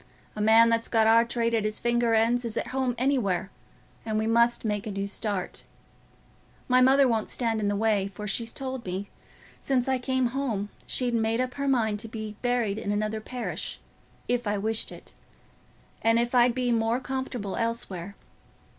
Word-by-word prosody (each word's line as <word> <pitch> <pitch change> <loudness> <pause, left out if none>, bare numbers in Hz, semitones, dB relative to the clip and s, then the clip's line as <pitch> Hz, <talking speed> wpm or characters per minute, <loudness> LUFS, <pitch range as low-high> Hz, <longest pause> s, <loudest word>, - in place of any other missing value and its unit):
"A 210 - -3
man 225 +2 +6
that's 230 0 +1
got 225 -1 +3
our 225 +1 +6
trade 235 0 -1
at 225 -2 +2
his 215 0 -1
finger 235 -1 +2
ends 235 +2 +2
is 230 -2 -4
at - - -2
home 255 -1 -1
everywhere; 235 -8 0 0.5
and 215 -1 -2
we 220 - 0
must 235 +1 +2
make 210 -1 -1
a - - -3
new 195 0 -2
start. 200 -2 -3 1.0
My 255 0 +4
mother 270 +1 +6
won't 225 -3 0
stand 230 -3 -1
in 210 - 0
the 205 - +1
way, 210 -2 +1
for 205 +2 -7
she's 230 +3 -1
told 260 -2 -5
me, 190 +1 -5 0.5
since 260 -2 0
I 260 -1 +1
came 260 -1 0
home, 235 -6 -2 0.2
she'd 250 -2 -1
made 225 0 +1
up 255 0 -1
her 280 +1 -3
mind 220 -6 +1
to 225 - -6
being 215 -1 -6
buried 240 -4 0
in 205 - -3
another 215 +1 -1
parish, 250 +2 -5 0.5
if 245 -2 0
I 205 0 0
wished 220 +2 -1
it, - - -12 0.9
and 225 0 +3
if 240 +1 +1
I'd 245 -1 +4
be 250 -1 0
more 230 +1 +1
comfortable 260 -6 -4
elsewhere. 200 -5 -3
230 Hz, 185 wpm, -27 LUFS, 215-245 Hz, 1.0 s, man